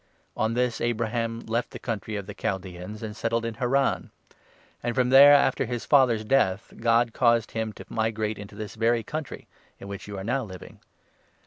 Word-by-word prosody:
On 110 +1 0
this, 125 -1 0
Abraham 115 0 -1
left 115 +2 -2
the - - -8
country 110 -2 -4
of 100 -2 -4
the - - -8
Chaldaeans 95 +2 -5
4 - - -4
and 105 -1 -7
settled 115 +1 -1
in 115 - -3
Haran; 135 +3 0 0.7
and 120 0 -2
from 125 -1 +2
there, 140 +2 +9
after 140 - +2
his 120 0 -4
father's 125 -6 +4
death, 105 -6 +1
God 115 0 +2
caused 115 -3 +2
him 110 -1 -2
to - - -11
migrate 110 -2 -2
into 100 0 -10
this 105 -1 -6
very 115 +1 +1
country, 155 +2 -6 0.3
in 100 - -9
which 100 0 -7
you 100 -1 -6
are 95 - -5
now 125 +5 -1
living. 95 -4 -11
115 Hz, 190 wpm, -26 LUFS, 105-120 Hz, 0.7 s, there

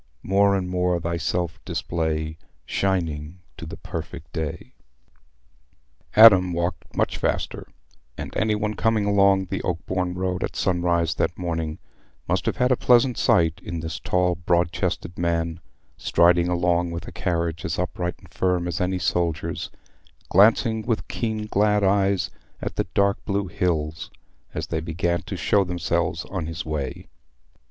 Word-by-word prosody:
More 100 +1 +3
and 95 -2 -1
more 90 -1 +1
thyself 85 0 -2
display, 80 -1 -2 0.3
Shining 85 -4 -1 0.2
to - - -8
the - - -8
perfect 80 0 -7
day." 80 -3 -4 1.4
Adam 95 -5 +8
walked 85 +1 -3
much - - +1
faster, - - -2 0.5
and - - -6
any 110 0 +2
one 105 0 -1
coming 110 0 +1
along 100 -1 +4
the - - -3
Oakbourne 90 +1 -2
road 90 0 -1
at - - -4
sunrise 85 -2 +1
that 90 - -1
morning 80 -3 -3 0.5
must - - 0
have - - 0
had 125 +1 +2
a - - +5
pleasant 125 +1 +4
sight 85 -5 +2
in 85 -2 -4
this 80 0 -5
tall 90 -1 +1
broad 85 -1 +1
chested 85 - -3
man, 85 -1 0 0.4
striding 85 0 +4
along 90 0 +1
with 85 0 -6
a - - -7
carriage 85 -2 -2
as 85 - -2
upright 90 0 -2
and - - -19
firm 90 -1 +1
as 85 -1 -2
any 90 +1 0
soldier's, 85 -1 -1 0.6
glancing 110 +2 +4
with 115 0 -2
keen 110 -2 -2
glad 105 0 +2
eyes 95 0 +2 0.3
at - - -5
the - - -1
dark 100 0 +2
blue 100 -1 -1
hills 80 -3 -2 0.5
as - - -2
they 80 - -1
began 85 +2 -1
to - - -6
show 100 -1 +3
themselves 85 -1 -1
on 90 -5 -4
his 80 0 -5
way. 75 -4 -4
90 Hz, 150 wpm, -24 LUFS, 85-95 Hz, 1.4 s, Adam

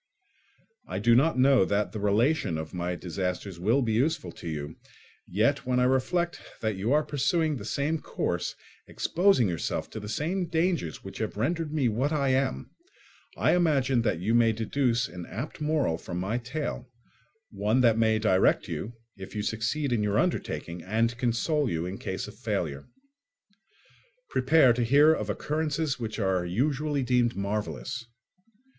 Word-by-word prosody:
I 90 - -4
do 115 +4 +4
not 140 +5 +4
know 130 -3 +5
that 100 +2 0
the 110 - -5
relation 105 - +1
of 80 0 -6
my 90 0 -2
disasters 90 +1 -4
will 115 +9 +2
be 110 -2 0
useful 125 - 0
to 85 - -8
you; 75 0 -5 0.5
yet, 115 +9 +1
when 125 -1 +1
I - - +3
reflect 170 +7 +1 0.2
that 110 -2 -1
you 100 +6 -1
are 150 +2 +4
pursuing 155 +2 0
the 100 - -8
same 145 +8 -1
course, - - -2 0.3
exposing 180 - +2
yourself 85 -4 -3
to 110 - -6
the 105 0 -7
same 175 - -1
dangers 165 - -1
which - - -8
have - - -3
rendered 160 +7 -1
me 150 -5 +1
what 125 +7 0
I 140 -3 +1
am, 130 0 0 0.7
I - - +3
imagine 135 -8 +2
that 110 -7 0
you 105 +6 0
may 115 -1 +4
deduce 115 +2 0
an 90 0 -9
apt 130 +8 -6
moral 150 - +1
from 90 - -6
my 100 +7 -1
tale, 125 0 -5 0.6
one 105 +4 +1
that 115 -3 +5
may 110 -1 +3
direct 105 -4 +3
you 115 - -5 0.2
if 95 +2 -9
you 105 - -2
succeed 115 +6 -1
in 115 - +1
your 105 0 +1
undertaking 85 - -1
and 115 +4 0
console 125 +4 0
you 80 -2 -2
in 95 +2 -5
case - - -4
of - - -10
failure. 70 -1 -3 1.4
Prepare 130 -1 +5
to 120 +1 0
hear 145 +6 +6
of 105 -9 -3
occurrences 150 +4 -1
which 110 -2 -4
are 95 -4 +1
usually 140 +9 0
deemed 120 -1 +2
marvellous. 105 +4 -3
120 Hz, 165 wpm, -28 LUFS, 100-145 Hz, 1.4 s, hear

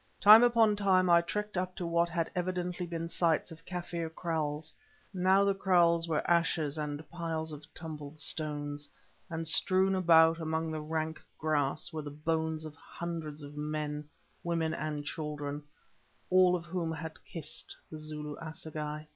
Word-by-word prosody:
Time 215 +3 +10
upon 230 -3 +5
time 185 -3 +3
I 170 0 +7
trekked 210 +2 -3
up 185 0 -3
to 180 - -4
what 170 0 +2
had 165 -1 -1
evidently 180 0 -2
been 165 -1 -4
the 165 - -4
sites 165 0 +1
of 165 0 -11
Kaffir 175 -2 -4
kraals. 160 -2 -3 0.4
Now 190 +1 +4
the 200 - +3
kraals 175 -3 +3
were 155 -2 -1
ashes 165 -3 +2
and 150 0 -4
piles 165 -2 -3
of 150 +1 -10
tumbled 155 -2 -8
stones, 145 -1 -2 0.4
and 165 -1 -3
strewn 185 +4 +4
about 165 -3 +5
among 160 0 -1
the 155 -1 -3
rank 160 +1 -3
grass 155 +2 0
were 155 - -3
the 145 - -6
bones 160 +1 -1
of 155 - -7
hundreds 160 -2 -6
of 145 +1 -9
men, 150 0 -3 0.3
women, 165 -2 0
and 150 -2 -3
children, 145 -2 -4 0.7
all 185 -1 +6
of 175 -1 -4
whom 170 -2 -2
had 160 0 -7
kissed 165 -4 -6
the 155 - -7
Zulu 150 -1 -6
assegai. 155 -1 -6
160 Hz, 160 wpm, -31 LUFS, 150-175 Hz, 0.7 s, Time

